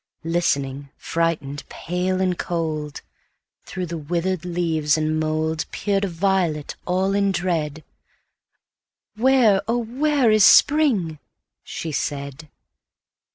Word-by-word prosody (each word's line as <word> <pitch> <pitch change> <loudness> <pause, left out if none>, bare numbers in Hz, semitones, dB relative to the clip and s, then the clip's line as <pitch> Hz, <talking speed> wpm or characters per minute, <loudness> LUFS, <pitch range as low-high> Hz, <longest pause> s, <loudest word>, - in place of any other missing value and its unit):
Listening, 140 -5 -1
frightened, 160 -4 -2
pale, 180 +2 -2
and 185 -1 +1
cold, 155 -4 -3 0.6
Through 185 -1 -4
the 170 -1 -5
withered 175 +3 -2
leaves 160 -4 0
and 155 0 0
mouldPeered 160 +6 -1
a - - -1
violet 175 -4 -1
all 190 +2 +1
in 200 0 +2
dread—"Where, 190 - -2
oh, 235 +1 +1
where 265 +1 +1
is 215 -1 +5
spring?" 225 - +4 0.4
she 160 - -5
said. 140 +1 -4
170 Hz, 100 wpm, -22 LUFS, 155-195 Hz, 0.6 s, is